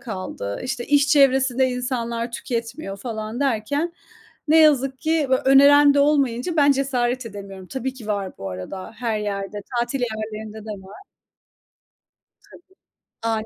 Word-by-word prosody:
kaldı. 185 - -5
İşte 255 -1 -3
iş 285 0 +3
çevresinde 265 -2 +4
insanlar 240 -2 -3
tüketmiyor 230 -3 -4
falan 220 +2 -5
derken 285 +6 0 0.6
ne 320 - +6
yazık 275 -4 +4
ki, 315 -2 +1
böyle 260 - +2
öneren 280 +1 +7
de 285 - +4
olmayınca 280 +1 +1
ben 285 -1 +5
cesaret 255 -2 -1
edemiyorum. 195 -3 -9
Tabii 265 +2 -4
ki 235 -5 -11
var 200 -3 -3
bu 95 -1 -5
arada 140 - -7
her 230 -2 -2
yerde. 205 0 -4 0.2
Tatil 240 +3 -2
yerlerinde 220 -2 -5
de - - -6 0.2
var. 285 - -13 1.5
Tabii. - - -15 0.6
Annem. 225 -1 -1
245 Hz, 140 wpm, -22 LUFS, 215-275 Hz, 1.5 s, öneren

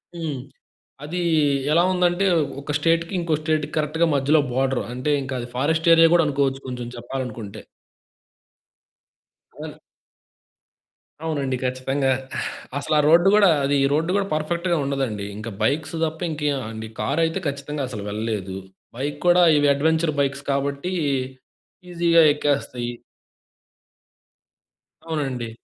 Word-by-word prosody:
హ్మ్, 160 -5 -4 0.7
అది 165 +5 -4 0.5
ఎలా 165 +3 +5
ఉందంటే 180 +1 +2 0.4
ఒక 145 +1 -4
స్టేట్‌కి 165 +3 +1
ఇంకో 170 -2 -1
స్టేట్‌కి 155 -1 -1
కరెక్ట్‌గా 155 +2 +1
మధ్యలో 140 +3 +3
బోర్డర్. 130 0 0
అంటే 130 +4 -1
ఇంకా 130 0 -5
అది 120 - -5
ఫారెస్ట్ 160 +5 +1
ఏరియా 165 0 +7
కూడా 175 -1 +5
అనుకోవచ్చు 135 -1 0
కొంచెం 125 -2 -5
చెప్పాలనుకుంటే. 120 -4 -6 2.0
ఆ! - - -8 1.5
అవునండి 140 -5 -1
ఖచ్చితంగా. 130 +2 0 0.7
అసల 140 +2 -2
ఆ - - +5
రోడ్డు 170 +4 +5
కూడా 205 -3 +6
అది 140 +1 +1
ఈ - - +4
రోడ్డు 160 +4 +1
కూడా 200 -1 0
పర్ఫెక్ట్‌గా 170 +3 0
ఉండదండి. 135 -7 -2
ఇంకా 110 +2 -6
బైక్స్ 155 +7 0
తప్ప 160 0 -5
ఇంకేమండి 135 -8 -3
కార్ 150 +4 0
అయితే 160 - -2
ఖచ్చితంగా 140 +1 -4
అసలు 105 -5 -6
వెళ్ళలేదు. 105 -3 -3 0.4
బైక్ 145 +3 -3
కూడా 175 0 +6
ఇవి 145 0 +3
అడ్వెంచర్ 160 +2 +1
బైక్స్ 140 0 0
కాబట్టి 140 +5 -2 1.0
ఈజీగా 170 -1 +4
ఎక్కేస్తాయి. 135 -5 -2 2.1
అవునండి. 135 -7 -3
145 Hz, 120 wpm, -23 LUFS, 130-160 Hz, 2.1 s, ఏరియా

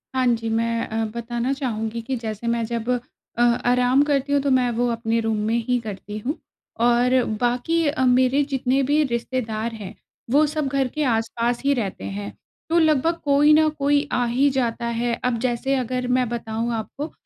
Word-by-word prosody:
हाँ 260 -1 +2
जी, 230 -1 0
मैं 230 +1 0
अ, 220 0 -2
बताना 240 +3 -2
चाहूँगी 230 -4 -3
कि 260 +3 -3
जैसे 225 -1 -5
मैं 235 0 +1
जब 235 +1 -4 0.5
अ, - - +1
आराम 245 +2 +3
करती 285 -1 0
हूँ, 285 - +3
तो 280 - 0
मैं 250 -1 +3
वो 245 0 +2
अपने 230 0 -1
रूम 220 -1 -1
में 225 - +1
ही 250 -1 +2
करती 210 -1 -7
हूँ 265 +9 -3 0.5
और 245 +1 +3 0.2
बाकी 250 +8 +1
अ, 285 -3 +1
मेरे 255 +3 +3
जितने 265 0 +1
भी 295 +3 +2
रिश्तेदार 235 -3 -2
हैं, 205 -4 -8 0.4
वो 300 +3 +5
सब 300 -1 -2
घर 270 -1 0
के 305 +4 -3
आस-पास 235 0 0
ही 280 - +4
रहते 200 - -3
हैं। 100 +1 -5 0.4
तो 335 - +2
लगभग 315 +1 +3
कोई 290 +1 +4
न 310 0 +5
कोई 285 +1 +2
आ 245 - +2
ही 265 +4 +2
जाता 235 -2 -1
है। 235 0 -1
अब 245 -2 +1
जैसे 255 +2 0
अगर 250 0 -2
मैं 250 -2 +1
बताऊँ 230 0 -3
आपको, 275 +7 -5
245 Hz, 190 wpm, -23 LUFS, 230-275 Hz, 0.5 s, वो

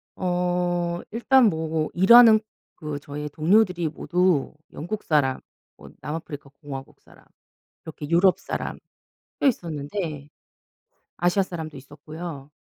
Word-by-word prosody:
어. 175 -1 -1
일단 245 +3 +4
뭐 160 -2 -2
일하는 220 +4 +8 0.4
그 150 -3 -6
저의 150 +1 -6
동료들이 175 +2 +2
모두 175 0 0 0.2
영국 205 +7 -5
사람 140 -4 +1 0.4
뭐 - - -13
남아프리카 150 -2 -6
공화국 135 -3 -9
사람 - - -21 0.6
이렇게 155 -2 -8
유럽 175 +3 +4
사람 - - -5 0.6
꽤 - - +4
있었는데 155 - -4 0.9
아시아 175 +3 +2
사람도 160 -5 -7
있었고요. 145 +1 -9
165 Hz, 250 characters per minute, -24 LUFS, 150-180 Hz, 0.9 s, 일하는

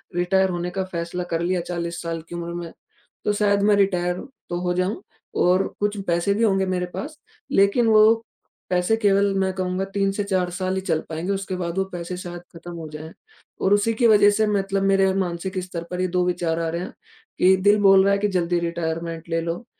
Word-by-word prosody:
Retire 190 +2 +2
होने 175 0 -2
का 190 - +1
फ़ैसला 170 +1 -3
कर 165 - 0
लिया 175 0 0
40 170 -1 -4
साल 165 -1 -4
की - - -6
उम्र 170 0 -5
में, 170 -1 -6 0.5
तो 210 - +2
शायद 200 -1 +2
मैं 205 0 +4
रिटायर 180 -3 +1 0.3
तो 175 0 -2
हो 180 0 0
जाऊँ 185 - -1 0.4
और 185 +2 +3
कुछ 205 0 0
पैसे 175 +3 +1
भी 225 - -1
होंगे 195 -3 +2
मेरे 180 -1 -1
पास। 305 +1 -6 0.3
लेक़िन 200 +2 +4
वो 215 0 +6 0.6
पैसे 180 +4 +2
केवल 200 -2 +3
मैं 190 0 +1
कहूँगा 185 0 -2
3 195 -1 +2
से 205 0 -2
4 185 -3 0
साल 185 +1 -2
ही 190 - 0
चल 160 -4 0
पाएँगे, 165 +4 -3
उसके 195 -1 -3
बाद 175 0 -3
वो 195 - +2
पैसे 175 +1 -5
शायद 175 -1 -7 0.2
ख़त्म 175 +1 -9
हो 160 -2 -7
जाएँ 155 +2 -8 0.5
और 195 +2 +3
उसी 215 +3 +1
की 235 +1 +2
वजह 205 -2 +6
से 215 +1 +1
मतलब 195 -1 0
मेरे 195 -1 +3
मानसिक 185 0 -2
स्तर 175 -2 -6
पर 180 0 -3
ये 185 - +1
2 180 0 +1
विचार 175 -2 -1
आ 165 - -1
रहे 170 +1 -2
हैं, - - -7 0.5
कि 190 +1 +5
दिल 205 +3 +4
बोल 195 -1 +7
रहा 200 - +3
है 200 - +2
कि 210 - +1
जल्दी 175 -2 0
रिटायरमेंट 165 -1 -3
ले 165 0 0
लो, 170 +6 -4
185 Hz, 220 wpm, -23 LUFS, 175-200 Hz, 0.6 s, बोल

